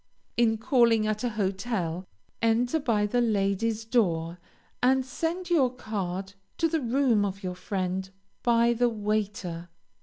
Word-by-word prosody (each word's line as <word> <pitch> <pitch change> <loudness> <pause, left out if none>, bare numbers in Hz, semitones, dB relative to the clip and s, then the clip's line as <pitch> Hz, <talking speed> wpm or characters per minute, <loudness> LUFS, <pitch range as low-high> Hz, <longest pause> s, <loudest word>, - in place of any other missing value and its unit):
In 225 -2 +3
calling 230 -2 +3
at 215 +1 -1
a 245 - +1
hotel, 190 -4 -2 0.3
enter 235 +6 +2
by 225 -7 +1
the 245 +4 +1
ladies' 215 0 0
door, 175 -7 0 0.4
and 260 +1 +3
send 340 +7 -3
your 270 -7 +4
card 195 -5 -4 0.2
to 330 - +2
the 320 -1 -1
room 245 -3 +2
of 195 0 -3
your 180 -1 -2
friend 185 0 -3 0.3
by 235 0 +3
the 240 +1 +2
waiter. 205 -5 -2
220 Hz, 140 wpm, -27 LUFS, 195-245 Hz, 0.4 s, your